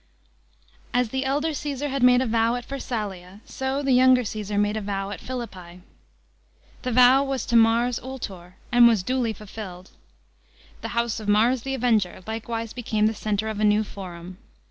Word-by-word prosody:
As 245 -2 +2
the 265 +3 -2
elder 295 +4 0
Caesar 290 -1 -3
had 275 0 -2
made 250 0 +6
a - - 0
vow 230 0 +1
at 245 0 -6
Pharsnlia,. 205 -8 -5 0.2
o 265 +2 -1
the 275 - +1
younger 255 0 +5
Caesar 210 -1 -4
made 205 +1 +1
a 220 - -2
vow 195 -1 -3
at 195 - -7
Philippi. 185 -9 -7 1.0
The 250 - -3
vow 250 +3 +6
was 270 -2 -3
to 235 - -1
Mars 230 +2 +4
Ultor, 195 -9 -8 0.2
and 240 0 +7
was 220 -6 +2
dul\ 250 0 0
fulfilled. 190 -3 -9 0.9
The - - -4
house 235 -1 0
of 215 - -8
Mars 225 +5 +3
the 270 +2 -3
Avenger 220 -8 0
likewise 225 0 -4
became 220 -3 0
the 220 - +2
centre 215 0 -2
of 215 -1 -4
a - - 0
new 210 0 +4
Forum. 185 -3 -9
225 Hz, 175 wpm, -24 LUFS, 205-255 Hz, 1.0 s, and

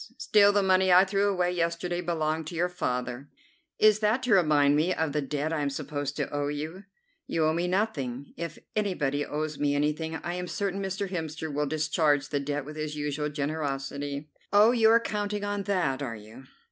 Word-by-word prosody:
Still, 205 -1 +5
the 205 -1 +2
money 190 0 +4
I 180 +2 +7
threw 200 +1 +1
away 180 -2 +1
yesterday 175 0 -1
belonged 160 -2 -1
to 170 - -6
your 175 +2 +1
father." 125 -5 -3 0.5
"Is 215 -1 +5
that 220 +4 +1
to 250 -3 +2
remind 150 -6 +4
me 165 +5 +2
of 160 -2 -1
the 150 +1 0
debt 145 +3 -2
I 155 - -1
am 145 - 0
supposed 145 0 -4
to 145 - -1
owe 145 0 -1
you?" 155 +7 -5 0.4
"You 160 -1 +1
owe 155 - +2
me 170 +2 0
nothing. 140 - -2
If 170 -1 -5 0.2
anybody 150 -9 0
owes 150 0 -4
me 145 -1 +1
anything 150 +2 -1
I 175 +2 -4
am 180 0 -4
certain 195 +1 -2
Mr. 195 +1 -2
Hemster 160 -3 -4
will 145 +1 0
discharge 150 -2 +1
the 145 - 0
debt 145 0 -3
with 150 +1 -9
his 155 -1 -3
usual 150 0 -2
generosity." 145 0 -3 0.2
"Oh, 210 +3 +6
you 225 -3 +4
are 230 +1 +6
counting 210 -2 -3
on 205 -1 -2
that, 175 -10 0
are 125 -5 -3
you?" 110 +5 -13
155 Hz, 195 wpm, -28 LUFS, 145-190 Hz, 0.5 s, I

